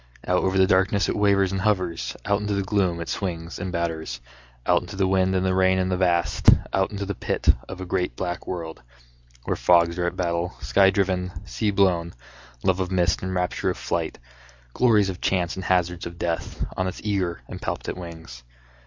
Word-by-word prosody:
Out 90 0 +2
over 95 0 +1
the 95 - +6
darkness 95 0 +2
it - - -1
wavers 100 -2 +3
and 95 -1 -2
hovers, 95 -5 -1
Out 100 0 +2
into 105 0 -1
the 100 - 0
gloom 95 -4 0
it 85 - -5
swings 85 -3 -4
and 95 -1 -4
batters, 80 -7 -3 0.5
Out - - +3
into 105 - -9
the 95 0 +1
wind 95 0 +2
and 95 0 +1
the 95 - +2
rain 95 0 +3
and 95 0 0
the - - +2
vast, 85 -2 +3 0.2
Out 95 0 +2
into 100 -1 -4
the 100 - -3
pit - - -2 0.2
of 95 - -7
a 95 - -5
great 90 -7 -1
black 90 +6 -4
world, 85 -3 -5 0.6
Where - - -1
fogs 85 0 +3
are 90 - +1
at - - -3
battle, 85 0 -1
sky 95 -1 +4
driven, 95 -2 0
sea 110 - -1
blown, 90 -4 +2 0.5
Love 95 0 +2
of 90 -1 -1
mist 90 -2 +2
and 95 0 -3
rapture 90 0 0
of - - -2
flight, - - -2 0.6
Glories 110 -6 +4
of 90 - -6
chance 90 -3 0
and 95 - -6
hazards 90 -1 +1
of 85 0 -10
death 85 -1 -3
On 95 - -1
its 95 - -5
eager 95 - -1
and - - -8
palpitant - - -3
wings. 80 -8 -9
95 Hz, 205 wpm, -24 LUFS, 85-95 Hz, 0.6 s, the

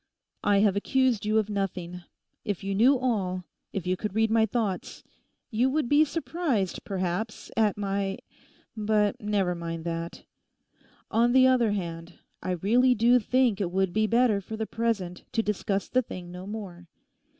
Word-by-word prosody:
'I 200 -1 +4
have 205 -2 +3
accused 240 0 +1
you 215 +1 +2
of 215 -2 +2
nothing. 180 -3 -3 0.4
If 205 -2 -3
you 195 0 -2
knew 250 +7 +5
all; 195 -8 -1 0.3
if 195 - -4
you 180 +1 +1
could 210 +1 -5
read 220 0 +2
my 220 0 +4
thoughts, 210 -4 -3 0.5
you 240 +4 +2
would 295 -1 0
be 290 +4 +5
surprised, 300 - -2
perhaps, 190 +3 -3
at 215 -3 +2
my—But 205 +1 -2
never 205 -4 0
mind 165 -1 -5
that. 170 0 -4 0.9
On 235 +2 +3
the 260 0 +6
other 245 -5 +3
hand, 170 -3 -5 0.3
I - - -4
really 240 +8 +3
do 240 +3 +5
think 240 -2 +2
it 185 - 0
would 190 0 0
be 215 0 +2
better 230 -3 +3
for 220 +3 -7
the 220 - -2
present 215 -7 -2
to 225 - +1
discuss 200 -1 -1
the 255 - +2
thing 180 -7 -8
no 180 +2 -8
more. 190 -5 -7
210 Hz, 160 wpm, -27 LUFS, 185-230 Hz, 0.9 s, the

